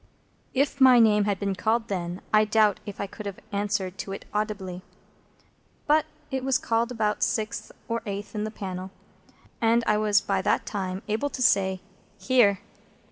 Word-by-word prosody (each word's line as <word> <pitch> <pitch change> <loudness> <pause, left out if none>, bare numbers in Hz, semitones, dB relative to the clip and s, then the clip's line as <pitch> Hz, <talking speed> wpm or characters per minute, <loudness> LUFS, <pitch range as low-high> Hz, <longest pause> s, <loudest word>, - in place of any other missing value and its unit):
If 275 +1 +1
my 260 -2 +8
name 210 -3 +5
had 200 -2 0
been 200 -1 -1
called 225 +3 0
then, 180 -2 -3
I 215 0 +6
doubt 215 -1 +3
if 205 - -7
I - - -1
could 205 +1 -8
have 200 - -6
answered 200 -2 -2
to 195 - -4
it - - -8
audibly. 200 -4 -3 1.0
But 310 +1 +3 0.2
it 265 -1 -2
was 265 -1 +2
called 230 +1 0
about 215 -3 -1
sixth 215 -1 -1 0.2
or 230 0 -2
eighth 200 +2 -5
in 210 -1 -2
the 215 - -2
panel, 190 -3 -6 0.7
and 230 +1 +3
I 210 - +3
was 210 -1 +4
by 195 -2 -1
that - - +1
time 190 -1 -4
able 220 +7 -1
to 260 - -6
say, 190 -4 +3 0.4
"Here!" 215 -7 +3
210 Hz, 175 wpm, -26 LUFS, 195-230 Hz, 1.0 s, my